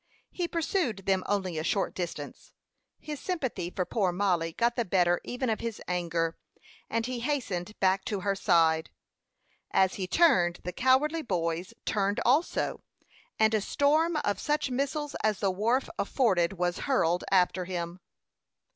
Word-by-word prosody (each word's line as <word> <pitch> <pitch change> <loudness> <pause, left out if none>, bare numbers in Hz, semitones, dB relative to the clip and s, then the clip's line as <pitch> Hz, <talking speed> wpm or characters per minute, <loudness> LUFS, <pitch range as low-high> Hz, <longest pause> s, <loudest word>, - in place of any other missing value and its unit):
He 350 -2 -2
pursued 315 - -1
them 190 -1 +2
only 190 -5 -1
a - - -3
short 195 +3 0
distance; 165 -5 -6 0.5
his 300 -2 -6
sympathy 260 - -3
for 180 0 -2
poor 195 -4 0
Mollie 175 -3 0
got 235 +5 +1
the 240 - +1
better 175 -3 +2
even 250 +1 -3
of 220 -2 0
his 230 -2 -4
anger, 170 -2 -1 0.5
and 230 0 0
he 250 -1 -3
hastened 220 -8 -3
back 190 0 +2
to 205 -3 -2
her 200 +1 +1
side. 165 -4 +3 0.8
As 190 -1 +3
he 185 - -1
turned, 180 - +3
the 180 - -4
cowardly 275 - +3
boys 175 - -2
turned 200 -1 0
also, 285 +8 +1 0.6
and 220 0 +3
a 215 - +2
storm 310 +8 +2
of 205 - 0
such 295 -2 0
missiles 280 +3 -2
as 215 -2 +1
the 195 -2 +1
wharf 230 +8 +1
afforded 190 -9 +2
was 180 -1 -1
hurled 175 -9 +2
after 185 -1 +3
him. 175 -1 -4
195 Hz, 155 wpm, -29 LUFS, 180-255 Hz, 0.8 s, side